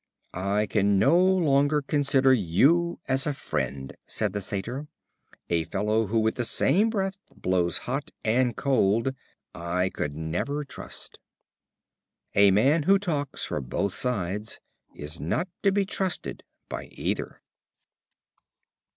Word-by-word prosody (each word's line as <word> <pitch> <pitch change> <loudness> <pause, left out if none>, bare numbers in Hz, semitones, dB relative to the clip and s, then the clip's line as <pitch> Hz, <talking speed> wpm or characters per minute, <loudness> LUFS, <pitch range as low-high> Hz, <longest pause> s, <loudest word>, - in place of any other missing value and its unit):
"I 100 +3 0
can 100 -1 +2
no 130 - +4
longer 150 -6 +3
consider 135 -2 +3
you 140 - +3
as 135 +1 +1
a 145 - -1
friend," 65 - -3
said - - -2
the 100 - -2
Satyr; 115 +10 -4 0.6
"a 85 -1 +1
fellow 105 +2 0
who 110 +4 0
with 110 +3 0
the 120 - 0
same 180 - +2
breath 195 -3 -2 0.2
blows 90 -2 +1
hot 135 +4 -3 0.2
and 120 +2 +2
cold 125 -2 +2 0.4
I 90 +2 -1
could 70 -1 -3
never 90 - -2
trust." 140 - -8 1.1
A 100 0 +6
man 135 - +4
who 195 - +7
talks 150 -8 -2
for - - -3
both 90 +10 -2
sides 105 -3 -2 0.4
is 75 +2 -6
not 150 - -1
to 200 - +3
be 200 0 +1
trusted 190 -3 -2 0.2
by - - -5
either. - - -4
115 Hz, 130 wpm, -26 LUFS, 95-145 Hz, 1.1 s, who